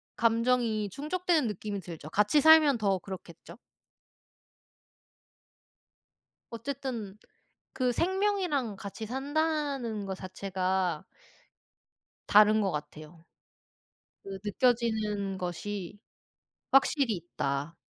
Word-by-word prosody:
감정이 230 -2 +1
충족되는 315 - 0
느낌이 210 -1 -4
들죠. 165 -5 -9
같이 210 - +3
살면 310 -3 +7
더 200 -3 +1
그렇겠죠? 175 -2 -10 2.9
어쨌든 235 -4 -5 0.6
그 255 -2 +1
생명이랑 360 - 0
같이 200 +3 -7
산다는 275 -4 -2
거 190 -1 -4
자체가 185 -2 -2 1.2
다른 215 +1 +6
것 195 -2 0
같아요. 155 +2 -8 1.0
그 195 -1 -7
느껴지는 210 -3 0
것이 185 +2 -5 0.7
확실히 270 -3 +3
있다. 150 -3 -3
215 Hz, 190 characters per minute, -29 LUFS, 190-270 Hz, 2.9 s, 살면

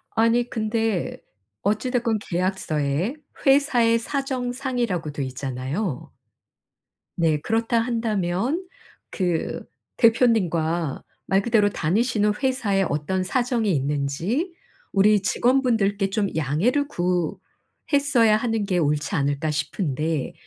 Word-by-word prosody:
아니 230 +2 +3
근데 220 -3 -1 0.5
어찌 215 +5 0
됐건 235 -3 0
계약서에 175 - -1 0.3
'회사의 265 -5 +4
사정상'이라고 245 - -2
돼 145 -1 -3
있잖아요. 130 - -4 1.1
네. 160 -3 +2
그렇다 225 +5 0
한다면 230 - -1 0.4
그 175 -4 -1 0.3
대표님과 175 - +2 0.2
말 195 0 +3
그대로 215 -2 +3
'다니시는 210 +5 +1
회사에 235 -8 +1
어떤 170 +6 -1
사정이 240 0 0
있는지 150 - -1 0.4
우리 205 +1 +4
직원분들께 220 -4 +2
좀 200 +1 0
양해를 170 - +1
구했어야 225 - 0
하는 225 -1 0
게 190 -3 0
옳지 150 +2 0
않을까?' 145 +1 0
싶은데 155 -2 -2
205 Hz, 245 characters per minute, -24 LUFS, 165-235 Hz, 1.1 s, 회사의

